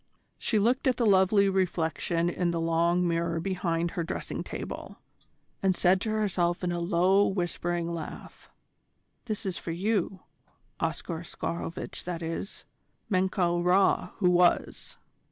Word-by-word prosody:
She 220 - +1
looked 240 +6 +2
at 255 -2 +2
the 235 - +1
lovely 200 0 +5
reflection 170 -3 0
in 175 0 0
the 170 -1 -1
long 170 +2 +2
mirror 170 0 0
behind 170 -2 -1
her 170 - -2
dressing 165 - -4
table, - - -7 0.6
and 190 -1 +2
said 185 +2 +3
to 220 - -2
herself 190 -5 0
in 175 - 0
a 175 - -2
low, 185 +3 +3
whispering 175 -2 -1
laugh: 170 -2 -7 0.8
"This 205 -5 -3
for - - -7
you, 190 +1 -1 0.6
Oscar 165 -2 -2
Oscarovitch 170 0 -5
that 175 -1 -4
is, 165 +4 -5 0.5
Menkau 185 -2 +1
Ra 185 +2 +3
who 180 -4 +3
was! 175 0 +2
180 Hz, 135 wpm, -28 LUFS, 170-195 Hz, 0.8 s, lovely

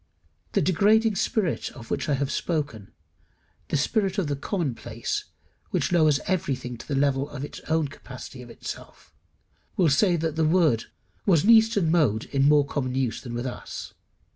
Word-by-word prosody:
The - - +2
degrading 210 +4 +3
spirit 190 -8 0
of 115 -4 -11
which - - -1
I 145 - +3
have 135 0 -1
spoken, 145 - -3 0.8
the - - 0
spirit 195 - 0
of 195 - +1
the 145 -1 -1
commonplace, 145 - -3 0.4
which - - 0
lowers 155 -5 +4
everything 130 -9 -2
to - - -11
the 140 - -1
level 140 0 +1
of 145 -1 -5
its - - -9
own 160 -1 +1
capacity 130 -1 -10
of 125 - -11
belief, 115 - -9 0.6
will 175 -4 +4
say 175 +6 +4
that 160 -1 -1
the 160 - +3
word 155 -7 +3 0.4
was 170 -6 +5
an 225 - +6
eastern 220 -7 +5
mode 130 -11 +2
in 140 0 +3
more 150 -1 +5
common 130 -3 -2
use 130 -4 -1
than 120 -2 -6
with 120 +2 -3
us. 125 - -6
150 Hz, 170 wpm, -26 LUFS, 135-175 Hz, 0.8 s, an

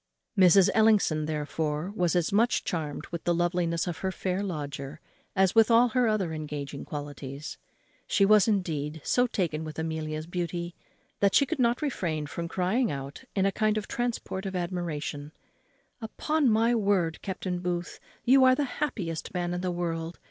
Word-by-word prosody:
Mrs. 190 -1 +6
Ellison, 210 -9 +3
therefore, 150 +2 -2
was 175 -2 +1
as 175 +3 +1
much 230 +4 +3
charmed 155 -4 -3
with 170 -1 -5
the 175 - +1
loveliness 175 -1 0
of 175 -3 -4
her 190 - -1
fair 185 +1 -2
lodger 145 -5 -5 0.4
as 190 -1 +3
with 225 0 +5
all 235 +1 +6
her 250 0 +2
other 200 -7 0
engaging 150 -2 -5
qualities. 145 0 -7 0.5
She 200 - +3
was, 210 0 +5
indeed, 160 -7 -1
so 245 0 +2
taken 165 -8 -2
with 155 -1 -7
Amelia's 155 -1 -3
beauty, 175 0 -3 0.5
that 200 -1 +3
she 280 - +6
could 310 +1 -3
not 240 +3 +2
refrain 170 - -2
from 170 +3 -5
crying 195 +8 +1
out 140 0 -6
in 190 -1 +2
a 195 - +3
kind 215 +1 +1
of 210 - -3
transport 230 -5 -3
of 190 - -5
admiration, 165 -4 -3 0.7
"Upon 285 +5 0
my 225 +2 +3
word, 195 -7 +1
Captain 185 -2 -3
Booth, 175 -1 -3 0.3
you 265 +2 +6
are 255 0 +6
the 290 - 0 0.2
happiest 185 - -3
man 175 0 -1
in 180 - -2
the 185 - -1
world! 170 -1 -3
175 Hz, 170 wpm, -28 LUFS, 155-210 Hz, 0.7 s, Mrs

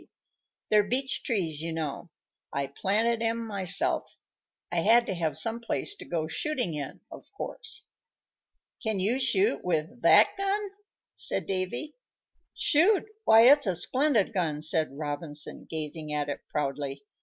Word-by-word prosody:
"They're 210 0 +6
beach 255 +6 -1
trees, 170 - -2
you 165 +1 -3
know; 160 +1 -4 0.4
I 140 0 -1
planted 220 +11 0
'em 230 0 -1
myself. 195 -4 0 0.5
I 175 - -2
had 230 +7 +5
to 195 - -2
have 165 -3 -2
some 230 0 -1
place 235 +11 -2
to - - -10
go 165 -3 -2
shooting 260 - -1
in, 145 -3 -6
of - - -12
course." - - -4 0.9
"Can 220 -4 -1
you 220 +8 +1
shoot 205 - +1
with 175 +7 -2
that - - +6
gun?" 395 +1 -1 0.4
said - - 0
Davy. 190 +11 -3 0.6
"Shoot! 360 +7 +3 0.2
Why, 220 0 +7
it's 275 +1 +6
a 185 - +1
splendid 255 - +2
gun!" 155 -6 -1
said 155 -3 +1
Robinson, 150 0 -3
gazing 155 -1 -4
at 145 -1 -1
it 145 - -3
proudly. 140 -1 -3
190 Hz, 145 wpm, -28 LUFS, 155-235 Hz, 0.9 s, Why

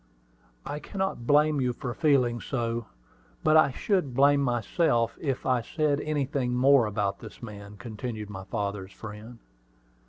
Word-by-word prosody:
I 150 - -4
cannot 190 - -3
blame 150 0 +4
you 125 -1 +1
for 125 0 -5
feeling 125 -6 +2
so; 115 -3 -2 0.6
but 155 0 +4
I 155 -3 +6
should 145 - -1
blame 140 +1 +5
myself 120 - +1
if 135 -5 -2
I 125 -2 +2
said 150 +2 0
anything 140 -4 -1
more 130 -2 +5
about 105 -1 -1
this - - -11
man," 105 -2 -9
continued 110 0 -6
my 95 -2 -7
father's 100 -2 -4
friend. 110 +2 -9
125 Hz, 145 wpm, -27 LUFS, 110-145 Hz, 0.6 s, I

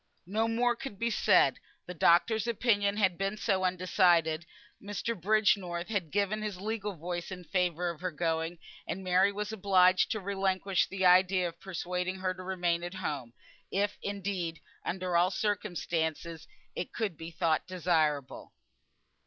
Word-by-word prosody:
No 215 +5 0
more 240 +1 +1
could 230 -4 -7
be 235 +3 0
said, - - +4 0.3
the 180 - -6
doctor's 200 +7 +3
opinion 205 -3 +1
had 190 -4 +2
been 195 +2 -1
so 195 -3 0
undecided; 175 -3 +2 0.3
Mr. 205 +3 -3
Bridgenorth 190 -3 +1
had 195 -7 -1
given 205 +4 0
his 210 -4 -4
legal 210 0 -3
voice 175 +1 -5
in 180 -1 -7
favour 180 -1 0
of 170 - -12
her 185 - -1
going, 165 +1 -2 0.3
and 190 +3 -4
Mary 185 +2 +3
was 210 +1 -4
obliged 185 -3 +4
to 215 - -1
relinquish 195 -1 0
the 190 -1 -2
idea 180 0 +5
of 170 0 -9
persuading 180 0 -3
her 185 -1 -2
to 185 - -10
remain 175 -2 -1
at 175 +2 -5
home, 145 -10 -4 0.4
if 205 +1 -1
indeed 195 -4 -3 0.2
under 180 -1 -2
all 175 +2 +4
the - - -6
circumstances 170 -6 -2 0.3
it 175 - -5
could 215 -7 -2
be 165 +2 -8
thought 165 0 0
desirable. 160 -6 -1
185 Hz, 155 wpm, -30 LUFS, 175-200 Hz, 0.4 s, idea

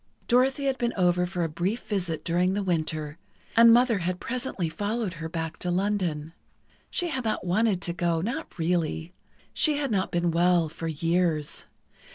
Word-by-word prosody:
Dorothy 260 +3 +3
had 265 -2 0
been 240 -1 0
over 180 -1 +3
for 180 -1 -2
a - - +1
brief 175 +9 -2
visit 175 -7 -2
during 180 +3 +1
the 205 - -1
Winter, 155 -3 -2 0.4
and 230 0 +8
Mother 240 -2 +4
had 180 +1 -2
presently 250 -8 -3
followed 205 +4 -2
her 160 - -4
back 165 -1 -4
to 180 - -2
London. 175 -5 -1 0.6
She 350 - -1
had 265 -4 -2
not 215 -4 -1
wanted 195 +1 +1
to 170 - -2
go—not 175 - -2
really. 165 0 -1 0.4
She 305 -2 +3
had 280 -4 -1
not 190 -3 +1
been 175 0 +1
well 170 -1 +3
for 165 +1 -6
years. 165 -1 0
180 Hz, 170 wpm, -27 LUFS, 165-225 Hz, 0.6 s, and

